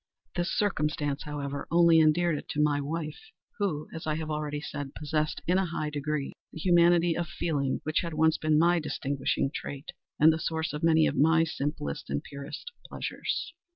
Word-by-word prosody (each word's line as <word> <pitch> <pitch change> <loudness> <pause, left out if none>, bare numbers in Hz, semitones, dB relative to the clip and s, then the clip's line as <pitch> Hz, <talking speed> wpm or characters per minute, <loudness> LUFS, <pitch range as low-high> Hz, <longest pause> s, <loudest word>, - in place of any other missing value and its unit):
This 175 0 0
circumstance, 150 -7 0
however, 145 -1 -4
only 170 0 +6
endeared 160 +1 +4
it - - -7
to 150 - -3
my 145 -1 +2
wife, 155 +2 -4 0.4
who, 155 -7 -1
as 160 -1 -6
I 155 - +1
have 155 0 -4
already 150 -1 -2
said, 145 -2 -6
possessed, 155 0 -1
in 180 +2 +3
a 190 - 0
high 155 -2 -3
degree, 145 -1 -2 0.2
that - - -8
humanity 175 -1 +4
of 170 0 -2
feeling 140 -5 -1
which 155 0 +1
had 170 -2 -4
once 160 0 +3
been 155 -1 +2
my 170 +2 +4
distinguishing 140 -3 -1
trait, 140 +1 -6 0.3
and 160 +2 +7
the 160 - -3
source 160 0 -2
of 150 - -4
many 160 -1 +5
of - - 0
my 160 +3 +5
simplest 145 - -3
and 70 +1 -2
purest 140 - -8
pleasures. 325 - -4
155 Hz, 185 wpm, -28 LUFS, 145-165 Hz, 0.4 s, and